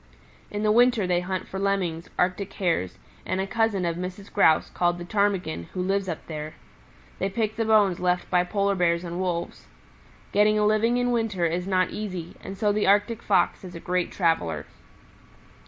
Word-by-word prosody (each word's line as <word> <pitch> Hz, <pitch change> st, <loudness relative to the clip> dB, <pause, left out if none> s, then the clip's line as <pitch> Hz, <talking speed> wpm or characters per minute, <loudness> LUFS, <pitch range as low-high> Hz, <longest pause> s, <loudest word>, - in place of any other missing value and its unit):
In 205 Hz, +1 st, -3 dB
the 210 Hz, -, +3 dB
winter 240 Hz, -2 st, +4 dB
they 180 Hz, -1 st, +2 dB
hunt 185 Hz, +1 st, -4 dB
for 190 Hz, -, -5 dB
Lemmings, 185 Hz, -4 st, -1 dB
Arctic 185 Hz, +2 st, 0 dB
Hares 170 Hz, -, -1 dB, 0.3 s
and 185 Hz, -, -2 dB
a 190 Hz, -, 0 dB
cousin 215 Hz, -3 st, 0 dB
of 170 Hz, -1 st, -1 dB
Mrs. 185 Hz, +2 st, -7 dB
Grouse 160 Hz, -6 st, +4 dB
called 175 Hz, 0 st, +1 dB
the 175 Hz, -, -7 dB
Ptarmigan, 185 Hz, -, 0 dB
who -, -, -3 dB
lives 195 Hz, 0 st, 0 dB
up 165 Hz, -, -5 dB
there. 155 Hz, -1 st, -6 dB, 0.6 s
They 195 Hz, -, 0 dB
pick 215 Hz, +1 st, -1 dB
the 225 Hz, 0 st, -1 dB
bones 210 Hz, -5 st, +4 dB
left 180 Hz, 0 st, 0 dB
by 180 Hz, -1 st, +4 dB
Polar 200 Hz, +2 st, 0 dB
Bears 170 Hz, -2 st, +1 dB
and 175 Hz, 0 st, -5 dB
Wolves. 175 Hz, -2 st, -3 dB, 0.6 s
Getting 210 Hz, +1 st, +4 dB
a 210 Hz, -, +2 dB
living 220 Hz, +3 st, +2 dB
in 245 Hz, 0 st, +1 dB
winter 225 Hz, -7 st, 0 dB
is 175 Hz, +3 st, -1 dB
not 185 Hz, -1 st, +1 dB
easy, 185 Hz, -5 st, -5 dB
and 195 Hz, -, -7 dB
so 210 Hz, +1 st, +2 dB
the 205 Hz, -1 st, 0 dB
Arctic 205 Hz, +3 st, +3 dB
Fox -, -, +1 dB
is 180 Hz, -1 st, -9 dB
a -, -, -6 dB
great 180 Hz, 0 st, -1 dB
traveler. 125 Hz, -, 0 dB
190 Hz, 190 wpm, -25 LUFS, 175-210 Hz, 0.6 s, winter